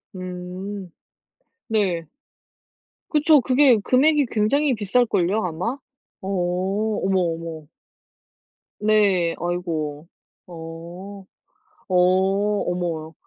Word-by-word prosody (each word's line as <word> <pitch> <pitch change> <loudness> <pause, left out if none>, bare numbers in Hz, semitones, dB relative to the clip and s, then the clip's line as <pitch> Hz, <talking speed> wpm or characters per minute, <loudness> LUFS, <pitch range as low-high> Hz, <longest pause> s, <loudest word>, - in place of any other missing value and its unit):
음. 185 +1 -6 0.8
네. 190 -7 0 1.0
그쵸. 300 -1 +5
그게 255 -1 +5
금액이 285 +3 +3
굉장히 265 +7 +2
비쌀걸요 210 -2 +1
아마? 180 - -3 0.4
어 190 - -7 0.7
어머, 190 -1 +1
어머. 165 -2 -3 1.1
네. 200 -5 +3
아이고. 165 -3 -3 0.4
어 175 +4 -9 0.6
어 185 - 0 0.7
어머. 165 -3 -3
185 Hz, 140 characters per minute, -23 LUFS, 170-220 Hz, 1.1 s, 그쵸